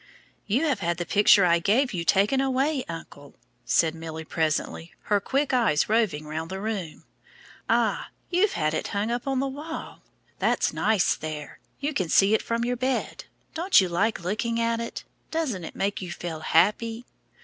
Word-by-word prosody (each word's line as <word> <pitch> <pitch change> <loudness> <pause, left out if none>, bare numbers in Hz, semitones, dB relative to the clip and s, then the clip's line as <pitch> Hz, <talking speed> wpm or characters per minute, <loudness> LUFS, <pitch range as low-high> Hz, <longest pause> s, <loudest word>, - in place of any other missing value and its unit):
"You 245 +9 +1
have 280 -9 +1
had 170 -2 -1
the 175 - -3
picture 200 0 +5
I 170 -1 +4
gave 240 - +2
you 170 -2 -2
taken 205 +10 +3
away, 270 +1 +1
uncle," 145 -4 -9 0.3
said 155 +6 +2
Milly 160 -1 -7
presently, 160 +1 -2 0.2
her 205 - +5
quick 275 +6 0
eyes 225 -12 +3
roving 210 -10 +1
round 160 +2 -5
the 190 +1 -5
room. 200 -6 -4 0.7
"Ah! - - +1 0.2
you've 370 +4 +3
had 155 -1 0
it - - -2
hung 205 +3 -2
up 240 +2 -3
on 270 -1 +1
the 275 - 0
wall. 300 +4 -7 0.4
That's - - +1
nice 215 -5 +2
there. 155 -2 -7 0.2
You 290 +2 -2
can 185 -10 -1
see 195 +5 +5
it 220 - +3
from 230 0 -1
your 245 0 -1
bed. 260 +2 -2 0.3
Don't 355 +4 +4
you 185 -2 +1
like 195 +4 0
looking 230 +5 -1
at 230 0 +1
it? 230 - -5 0.3
Doesn't 280 - -2
it - - -8
make 200 +1 -1
you 180 -2 -6
feel 170 -2 -5
happy?" 225 +8 +1
205 Hz, 180 wpm, -26 LUFS, 170-250 Hz, 0.7 s, picture